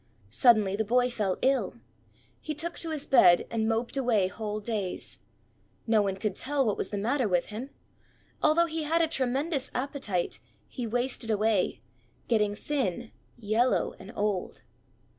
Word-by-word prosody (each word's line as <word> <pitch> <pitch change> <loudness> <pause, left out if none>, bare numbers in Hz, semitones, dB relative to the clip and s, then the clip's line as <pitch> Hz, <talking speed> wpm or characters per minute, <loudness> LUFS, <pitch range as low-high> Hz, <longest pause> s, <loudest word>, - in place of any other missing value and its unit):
Suddenly 210 - +4
the 220 - 0
boy 245 +3 +2
fell 205 -6 -1
ill. 270 +1 +1 0.6
He 305 - -5
took 340 +3 -2
to 330 - -5
his 310 -3 -1
bed, 180 -10 +6
and 220 -1 0
moped 230 +3 -1
away 230 -8 +2
whole 210 +2 -4
days. 210 -4 -4 0.7
No 220 -2 +3
one 195 -2 -1
could 200 +1 -2
tell 275 +5 0
what 210 - +1
was - - -3
the 205 - -3
matter 240 +4 +1
with 180 -3 0
him. 230 +6 -6 0.7
Although 335 +3 +4
he 325 -1 -3
had 325 +2 +2
a - - +2
tremendous 275 0 0
appetite, 245 - -2 0.3
he 245 -2 -5
wasted 245 0 -1
away, 215 -2 +1 0.5
getting 210 -3 +2
thin, 240 -4 -2 0.3
yellow, 230 +3 +1
and 195 - -10
old. 205 - -2
230 Hz, 155 wpm, -28 LUFS, 205-270 Hz, 0.7 s, bed